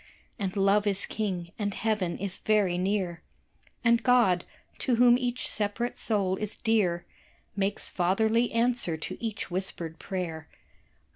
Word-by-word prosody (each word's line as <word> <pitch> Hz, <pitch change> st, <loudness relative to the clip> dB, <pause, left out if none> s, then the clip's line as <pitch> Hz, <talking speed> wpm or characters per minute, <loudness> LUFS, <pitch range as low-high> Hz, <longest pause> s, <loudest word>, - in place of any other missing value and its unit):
And 195 Hz, -1 st, -2 dB
Love 200 Hz, +2 st, +3 dB
is 200 Hz, -1 st, +3 dB
King, 185 Hz, -5 st, -3 dB
and 205 Hz, -2 st, -1 dB
Heaven 210 Hz, -6 st, -1 dB
is 195 Hz, -2 st, -2 dB
very 205 Hz, -5 st, +2 dB
near, 185 Hz, -2 st, -1 dB, 0.6 s
And 235 Hz, 0 st, +4 dB
God 230 Hz, -8 st, +4 dB, 0.3 s
to 250 Hz, -, +1 dB
whom 240 Hz, 0 st, +6 dB
each 250 Hz, 0 st, -1 dB
separate 215 Hz, +3 st, -2 dB
soul 195 Hz, -4 st, +1 dB
is 210 Hz, +1 st, -4 dB
dear 190 Hz, -6 st, +1 dB, 0.5 s
Makes 200 Hz, 0 st, -1 dB
fatherly 220 Hz, +6 st, +1 dB
answer 230 Hz, -8 st, +1 dB
to 160 Hz, -, -7 dB
each 220 Hz, -5 st, -3 dB
whispered 175 Hz, -3 st, -4 dB
prayer. 165 Hz, -4 st, -4 dB
205 Hz, 135 wpm, -28 LUFS, 185-225 Hz, 0.6 s, whom